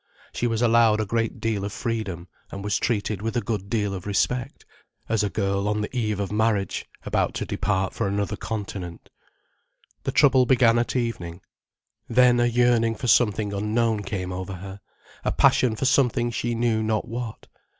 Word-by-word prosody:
She 120 - 0
was 115 0 0
allowed 115 -2 +4
a 110 - 0
great 115 +2 -1
deal 110 -3 -1
of 100 - -3
freedom 100 -8 -4 0.2
and 100 - -7
was 105 0 0
treated 105 -3 -1
with 115 +2 -2
a - - +4
good 100 -2 -3
deal 105 -3 0
of 95 +1 -6
respect, 120 +4 -1 0.4
as 110 -2 +1
a 105 - 0
girl 100 +1 -1
on 105 0 0
the 105 +4 -5
eve 105 -4 -1
of 100 -1 -2
marriage, 105 -3 0 0.2
about - - 0
to - - -2
depart 95 -2 -1
for - - -1
another 100 +1 -1
continent. 100 -6 -6 0.9
The - - -2
trouble 130 -3 +4
began 120 -3 +4
at 120 - -2
evening. 95 -8 -3 0.7
Then 125 0 +5
a 120 - +3
yearning 120 -1 +2
for 125 - -6
something 110 -3 +3
unknown 110 +2 0
came 95 -2 -4
over 95 +1 -5
her, 95 +2 -8 0.4
a - - 0
passion 120 -4 +3
for 135 - -2
something 125 -3 +2
she 120 0 -2
knew 115 -1 +1
not 110 0 -1
what. 115 -1 -6
110 Hz, 180 wpm, -24 LUFS, 100-120 Hz, 0.9 s, Then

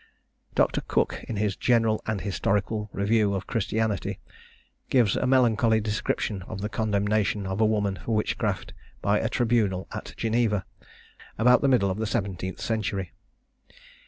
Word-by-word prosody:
Dr. - - +2
Cook, - - -1
in 115 - -4
his 100 -1 0
General 115 -3 +2
and 110 -3 -1
Historical 105 +2 -1
Review 100 0 +2
of 95 - -3
Christianity, 105 -3 -1 0.7
gives 120 -6 +3
a 130 - 0
melancholy 115 -3 +4
description 105 -1 -2
of 110 -3 -6
the 105 - -2
condemnation 105 -1 0
of 95 +3 -2
a 110 - +5
woman 105 -4 0
for 115 - -1
witchcraft, 105 - -1 0.3
by 100 +2 +3
a 110 - -1
tribunal 115 -6 +1
at - - -7
Geneva, 110 -4 +1 0.7
about 125 +3 +5
the 140 - +3
middle 120 -8 +3
of 95 - -4
the 110 - -1
seventeenth 95 -3 -3
century. 100 -5 -2
105 Hz, 145 wpm, -26 LUFS, 100-115 Hz, 0.7 s, a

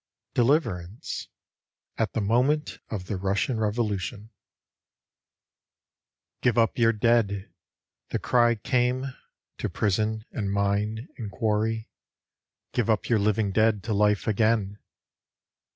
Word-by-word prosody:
DELIVERANCE? 115 - 0 0.7
{At 110 -3 -1
the 115 - 0
moment 130 +8 +1
of 100 -5 -4
the 100 - -3
Russian 100 +5 0
Revolution) 105 0 -2 1.4
" - - -61
Give 125 -2 +2
up 115 +1 +2
your 115 -1 +5
dead," 105 -3 +1 0.6
the - - 0
cry 120 -1 +3
came, 125 +2 0 0.5
to - - -1
prison 110 +2 0
and 100 -4 -2
mine 100 +4 0
and 110 -3 -4
quarry, 110 +1 0 0.4
" - - -57
Give 120 -3 0
up 110 -2 +1
your 115 -3 +4
living 105 0 +1
dead 110 0 +2
to 115 - -1
life 105 0 +2
again! 110 -1 +1
110 Hz, 120 wpm, -26 LUFS, 105-120 Hz, 1.4 s, your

